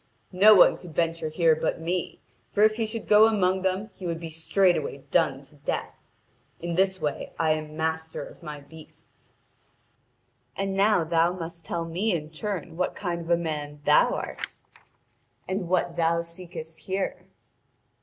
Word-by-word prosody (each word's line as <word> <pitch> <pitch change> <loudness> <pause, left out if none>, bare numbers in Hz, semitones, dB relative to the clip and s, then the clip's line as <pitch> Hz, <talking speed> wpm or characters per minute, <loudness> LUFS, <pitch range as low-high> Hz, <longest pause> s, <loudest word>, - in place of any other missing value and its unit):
No 210 +4 +8
one 185 - +6
could 175 -4 -12
venture 165 -1 0
here 160 0 +3
but 160 +1 -1
me, 175 +2 -3 0.3
for 205 - +3
if 215 0 +4
he 225 -2 0
should 225 0 -6
go 215 +1 +7
among 190 -4 +2
them 190 +3 -1
he 185 - -7
would 165 -1 -2
be 165 -1 -7
straightway 160 -3 +1
done 145 -5 +2
to 145 +2 -21
death. 145 - -3 0.7
In 170 0 -3
this 190 +1 +2
way 150 -2 -3
I 160 -1 +2
am 155 0 -3
master 160 0 -2
of - - -14
my 150 -1 -7
beasts. 155 +2 -16 1.2
And 195 0 -2
now 200 -2 +3
thou 165 +2 +2
must 170 -2 -7
tell 165 +2 -2
me 180 +5 0
in 155 -1 -5
turn 180 -1 -4
what 180 - -1
kind 175 -3 -3
of 165 - -9
a 170 - +4
man 150 -3 -4
thou - - +5
art, - - -5 0.9
and 185 -2 -2
what 175 -2 +1
thou 170 0 +2
seekest 170 -1 -9
here.' 190 0 -3
170 Hz, 165 wpm, -26 LUFS, 160-190 Hz, 1.2 s, No